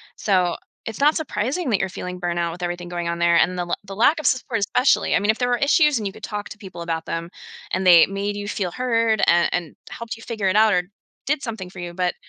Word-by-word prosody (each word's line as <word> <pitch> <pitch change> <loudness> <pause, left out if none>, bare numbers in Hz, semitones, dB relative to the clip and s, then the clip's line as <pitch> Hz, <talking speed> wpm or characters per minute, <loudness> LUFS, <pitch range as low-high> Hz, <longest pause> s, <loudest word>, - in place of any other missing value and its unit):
So 185 -4 +1 0.3
it's 225 +2 -6
not 295 +2 +4
surprising 270 +2 -2
that 205 - +2
you're 195 - 0
feeling 180 -1 -6
burnout 170 -1 -1
with 175 +2 -10
everything 175 0 -4
going 175 -1 -3
on 170 0 -2
there 170 0 +3
and 180 0 +2
the - - -1
l 175 - -4
the 195 0 -8
lack 290 +9 +3
of - - 0
support, 255 -5 0
especially. 250 +7 +2
I - - +4
mean, 205 +2 +3
if 220 - -7
there 245 - +1
were 245 - +2
issues 295 0 +3
and 215 - -4
you 195 - -3
could - - -15
talk 210 -1 -5
to - - -10
people 185 -4 -9
about 165 -1 -3
them 165 +1 -4 0.4
and 185 0 0
they 170 -2 +8
made 200 +1 -3
you 205 0 -5
feel 195 -4 -2
heard 230 -3 +1
and 170 0 +4
and 175 -3 -3
helped 230 -1 -6
you - - -14
figure 215 -5 -2
it 195 - 0
out 215 -1 +5
or 180 0 +2 0.4
did 290 0 0
something 220 -7 -6
for 180 - -12
you. 175 0 -6
But 180 0 -1
195 Hz, 265 wpm, -22 LUFS, 175-230 Hz, 0.4 s, they